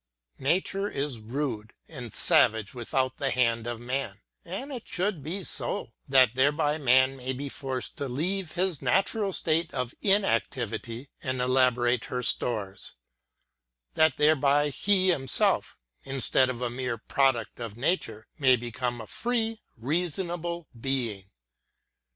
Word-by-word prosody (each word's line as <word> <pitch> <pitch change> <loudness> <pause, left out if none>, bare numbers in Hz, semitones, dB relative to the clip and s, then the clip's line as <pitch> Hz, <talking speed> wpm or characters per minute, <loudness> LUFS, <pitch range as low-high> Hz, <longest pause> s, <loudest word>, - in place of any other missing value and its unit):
Nature 190 +7 0
is 140 -4 -3
rude 115 -1 -4
and 125 -7 -8
savage 110 +1 +3
without 130 +1 -1
the 135 - 0
hand 115 -3 +1
of 120 -1 -4
man: 120 -4 -3 0.2
and 250 +12 -6
it 245 - -7
should 185 -3 -1
be 175 +7 -4
so, 120 -6 -4 0.2
that 130 -4 +5
thereby 145 +3 +2
man 130 0 +4
may 130 0 -4
be 140 +2 -5
forced 130 -2 -4
to 140 - -3
leave 170 +7 -2
his 180 -4 0
natural 195 +1 +1
state 165 -2 0
of 125 -2 -2
inactivity, 130 - 0
and 130 -2 -2
elaborate 125 -1 +2
her 125 0 -3
stores; 105 -5 -1 1.0
that 155 -4 +3
thereby 145 -1 +3
he 190 +6 +2
himself, 135 -7 +2 0.3
instead 135 -1 +2
of 125 -1 -4
a 120 - 0
mere 125 -1 -3
product 120 0 0
of 115 -2 -6
nature, 115 - -1
may 130 -3 +6
become 120 0 -3
a 110 - -7
free 225 - -2 0.2
reasonable 170 +5 -2
being. 115 -7 -2
135 Hz, 135 wpm, -28 LUFS, 120-165 Hz, 1.0 s, may